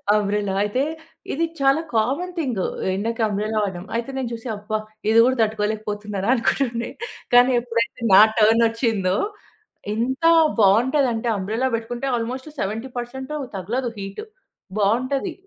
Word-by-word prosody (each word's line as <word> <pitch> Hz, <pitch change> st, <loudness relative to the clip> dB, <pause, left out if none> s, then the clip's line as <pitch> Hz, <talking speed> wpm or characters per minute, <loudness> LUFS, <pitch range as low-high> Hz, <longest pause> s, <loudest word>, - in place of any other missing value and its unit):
Umbrella. 205 Hz, -1 st, 0 dB
అయితే 210 Hz, +5 st, 0 dB, 0.5 s
ఇది 330 Hz, +4 st, +1 dB
చాలా 275 Hz, +3 st, +3 dB
కామన్ 275 Hz, +12 st, 0 dB
థింగ్ 255 Hz, -, -1 dB, 0.3 s
ఎండకి 230 Hz, +4 st, -2 dB
అంబ్రెల్లా 215 Hz, +1 st, -2 dB
వాడడం. 185 Hz, -2 st, -4 dB
అయితే 235 Hz, +3 st, -4 dB
నేను 260 Hz, -3 st, -2 dB
చూసి, 230 Hz, +2 st, -7 dB
అబ్బా! 210 Hz, +1 st, -3 dB, 0.3 s
ఇది 225 Hz, +1 st, +5 dB
కూడా 255 Hz, +1 st, +2 dB
తట్టుకోలేకపోతున్నారా 210 Hz, -1 st, -2 dB
అనుకుంటుండే. 235 Hz, 0 st, 0 dB, 0.5 s
కానీ, 245 Hz, +1 st, +7 dB
ఎప్పుడైతే 230 Hz, -1 st, -2 dB
నా 190 Hz, -, +10 dB, 0.2 s
టర్న్ 225 Hz, +2 st, +5 dB
వచ్చిందో, 225 Hz, -5 st, 0 dB, 0.8 s
ఎంత 255 Hz, +7 st, -2 dB, 0.4 s
బాగుంటదంటే 240 Hz, +3 st, +3 dB
అంబ్రెల్లా 220 Hz, +7 st, -1 dB
పెట్టుకుంటే, 240 Hz, +3 st, -4 dB
ఆల్మోస్ట్ 250 Hz, +5 st, -4 dB
70% 245 Hz, +5 st, -4 dB, 0.3 s
తగలదు. 235 Hz, +7 st, -2 dB
హీట్. 195 Hz, -, -6 dB, 0.6 s
బావుంటది. 255 Hz, -, 0 dB
230 Hz, 120 wpm, -22 LUFS, 210-255 Hz, 0.8 s, నా